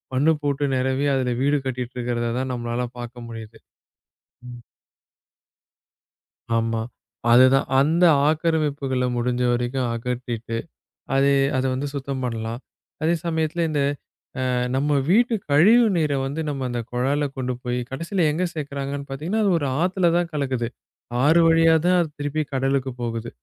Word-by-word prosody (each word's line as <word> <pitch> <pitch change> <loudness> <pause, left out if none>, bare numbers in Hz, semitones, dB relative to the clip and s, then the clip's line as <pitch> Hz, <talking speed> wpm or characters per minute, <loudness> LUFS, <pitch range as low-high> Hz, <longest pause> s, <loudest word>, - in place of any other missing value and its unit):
மண்ணு 145 +5 +4
போட்டு 145 0 0
நெரவி, 130 +2 0
அதுல 125 -2 0
வீடு 145 +1 +2
கட்டிட்டு 125 -1 -4
இருக்கிறத 120 -1 -1
தான் 130 0 -2
நம்மளால 120 0 -2
பார்க்க 120 0 -8
முடியுது. 115 -1 -9 0.9
ம். 120 -1 -9 2.0
ஆமா. 115 0 0 0.5
அது 125 +2 +8
தான். 135 - +2
அந்த 160 +6 +3 0.3
ஆக்கிரமிப்புகளை 150 -5 0
முடிஞ்ச 125 +1 -1
வரைக்கும் 120 +1 -1
அகற்றிட்டு, 120 -1 -4 0.6
அதை 140 +1 +4 0.2
அத 130 - +1
வந்து 140 +2 -3
சுத்தம் 135 -1 -4
பண்ணலாம். 115 0 -4 0.4
அதே 165 +2 +3
சமயத்துல 160 0 0
இந்த 150 -2 0 0.7
அ - - +1 0.3
நம்ம 145 +2 0 0.2
வீட்டு 230 +5 +4 0.2
கழிவு 215 +12 +6
நீரை 150 -4 +1
வந்து 145 +4 -3
நம்ம 135 -2 -3
அந்தக் 120 -1 -4
குழால 135 +4 0
கொண்டு 130 -1 -2
போய், 125 0 -2
கடைசியில 165 +6 -1
எங்க 170 +5 -1
சேர்க்கிறாங்கன்னு 140 -2 -5
பாத்தீங்கன்னா, 170 +11 -2
அது 200 - +3
ஒரு 145 - -2 0.2
ஆத்துல 180 -1 +2
தான் 175 -1 0
கலக்குது. 130 -5 -1 0.6
ஆறு 160 +3 +5
வழியா 165 0 +5
தான் 180 0 +4
அது 170 - 0
திருப்பிக் 145 0 -2
கடலுக்கு 135 0 0
போகுது. 115 -1 -3
135 Hz, 140 wpm, -23 LUFS, 125-155 Hz, 2.0 s, அது